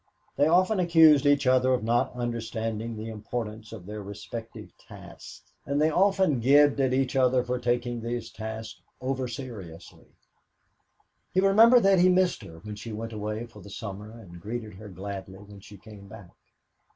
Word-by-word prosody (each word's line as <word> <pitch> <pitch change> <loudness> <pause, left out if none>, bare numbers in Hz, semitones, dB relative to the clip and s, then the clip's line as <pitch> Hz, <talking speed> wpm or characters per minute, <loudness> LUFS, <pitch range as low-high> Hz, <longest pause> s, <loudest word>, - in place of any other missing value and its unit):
They 145 - +3
often 185 +5 +3
accused 160 -5 +5
each 145 -1 +3
other 130 0 +3
of 120 - -5
not 120 +2 +1
understanding 115 -1 -4
the 110 +1 -6
importance 110 0 -6
of 105 -6 -10
their 105 +1 -7
respective 105 +3 -9
tasks - - -13 0.2
and 140 +1 -2
they 155 +1 +3
as - - -4
often 190 -6 +2
gibed 145 +4 +4
at 130 -1 +1
each 130 0 0
other 130 -1 +3
for 125 0 -3
taking 120 -1 -1
these 120 0 -4
tasks 110 +1 -7 0.2
over 130 0 -2
seriously. 105 - -9 1.3
He 185 - +2
remembered 225 +5 +6
that 195 -1 +4
he 180 +1 +5
missed 185 0 +2
her 80 - -12
when 105 -1 -7
she 115 +2 -8
went 115 +1 -6
away 105 +2 -4
for 120 - -15
the 100 - -12
summer 100 0 -7
and 100 -7 -13
greeted 110 +1 -6
her 105 +2 -11
gladly 95 0 -7
when 100 0 -14
she 100 +1 -14
came 100 0 -14
back. 100 -4 -13
115 Hz, 175 wpm, -27 LUFS, 105-135 Hz, 1.3 s, remembered